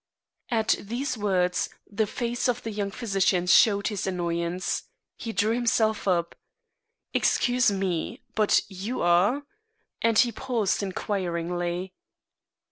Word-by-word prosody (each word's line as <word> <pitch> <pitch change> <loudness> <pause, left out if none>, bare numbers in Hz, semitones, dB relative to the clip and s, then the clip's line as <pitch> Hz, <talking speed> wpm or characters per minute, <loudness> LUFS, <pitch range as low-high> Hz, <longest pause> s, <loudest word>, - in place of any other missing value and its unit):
At 225 -3 0
these 245 +6 -3
words, 185 -4 0 0.2
the 215 +1 -1
face 240 +3 -2
of 245 - -1
the 225 - -4
young 205 -1 -2
physician 195 -5 +1
showed 200 +3 +5
his 205 -3 -3
annoyance. 175 0 -2 0.3
He 230 - -5
drew 210 +2 +1
himself 225 -3 +1
up. 170 -2 +1 0.8
"Excuse 250 -1 +3
me, 190 -4 -2
but 215 -1 +3
you 200 +6 -4
are 185 +11 +3 0.3
" 445 0 -48
and 230 -1 +3
he 240 0 +5
paused 230 -4 -1
inquiringly. 180 -2 -2
200 Hz, 125 wpm, -26 LUFS, 180-230 Hz, 0.8 s, showed